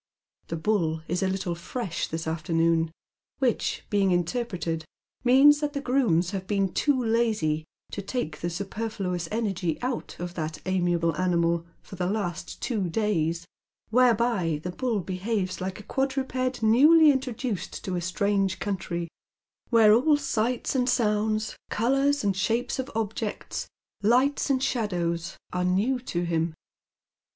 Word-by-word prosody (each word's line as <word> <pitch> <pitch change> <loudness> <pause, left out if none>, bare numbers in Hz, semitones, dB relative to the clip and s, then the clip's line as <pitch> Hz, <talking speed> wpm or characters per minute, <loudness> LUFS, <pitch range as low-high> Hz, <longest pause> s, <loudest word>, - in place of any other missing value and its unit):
The 165 - -3
Bull 160 -3 0
is 175 +3 -1
a 190 - +2
little 190 -2 -1
fresh 180 +2 -4
this 160 +1 -4
afternoon, 165 0 +1 0.5
which, 255 -4 0
being 200 -2 +3
interpreted, 175 -3 -1 0.4
means 275 +4 +7
that 295 -1 -2
the 280 - -2
grooms 235 -11 +2
have 190 -2 -4
been 195 -2 0
too 285 -3 +2
lazy 215 -10 +1 0.3
to 200 - -4
take 195 -7 -3
the 175 - -1
superfluous 190 -1 -3
energy 195 -7 -1
out 250 -1 -3
of 175 0 -5
that 155 -2 -4
amiable 175 -3 +1
animal 170 -1 +1 0.2
for 190 - -11
the 180 0 0
last 185 -4 -3
two 210 -8 -1
days, 170 -4 0 0.5
whereby 230 -9 +3
the 180 - -3
Bull 230 +1 -1
behaves 185 +1 -2
like 190 +1 -4
a - - -10
quad 270 +3 -1
ruped 255 -2 -1
newly 300 +8 +7
introduced 255 -5 -3
to 185 - -2
a 175 - -1
strange 195 +1 0
country, 175 -4 -3 0.6
where 225 -3 +6
all 290 +6 +4
sights 245 -3 -1
and 255 -1 +1
sounds, 215 -3 +1
colours 275 +5 +2
and 200 -2 +1
shapes 225 +7 0
of 260 +1 -3
objects, 220 -1 -3 0.3
lights 255 +8 +3
and 265 -1 +2
shadows, 175 -9 -1 0.2
are 180 0 0
new 200 +9 +1
to 175 -8 -3
him. 165 -1 -1
200 Hz, 145 wpm, -26 LUFS, 175-245 Hz, 0.6 s, means